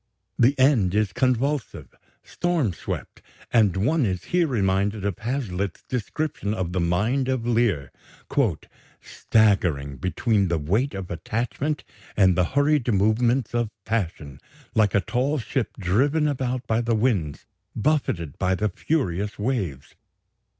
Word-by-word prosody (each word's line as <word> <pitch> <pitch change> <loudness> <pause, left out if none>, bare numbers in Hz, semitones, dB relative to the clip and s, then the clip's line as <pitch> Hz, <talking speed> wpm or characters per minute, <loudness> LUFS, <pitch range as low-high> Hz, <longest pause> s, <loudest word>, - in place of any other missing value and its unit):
The 130 +4 +4
end 125 -9 +3
is 105 -3 +1
convulsive, 130 +2 0 0.3
storm 165 - -1
swept; - - -6 0.3
and 105 -6 +4
one 140 +10 +2
is 95 -5 -1
here 175 -2 +4
reminded 100 -3 0
of 100 - -2
Hazlitt's 110 -7 -3
description 125 -2 -3
of 90 -4 -3
the 90 - -1
mind 105 +11 +1
of 130 -3 -1
Lear, 110 - +1 1.1
"staggering 90 - +1
between 100 - +1
the 85 -1 0
weight 100 - 0
of 95 -2 -6
attachment 120 - -2 0.3
and 95 -3 +5
the 90 0 +3
hurried 145 -4 +3
movements 115 +5 +2
of 120 -2 0 0.2
passion, 85 -11 -3 0.3
like 105 -3 +3
a 100 - +4
tall 130 - 0
ship 130 -1 -3
driven 135 - +2
about 130 -3 -2
by 110 +1 +1
the 115 -1 +1
winds, 105 - 0 0.3
buffeted 105 - -1
by 95 0 +2
the 105 +3 0
furious 105 - -2
waves 100 - -3
110 Hz, 130 wpm, -24 LUFS, 95-130 Hz, 1.1 s, and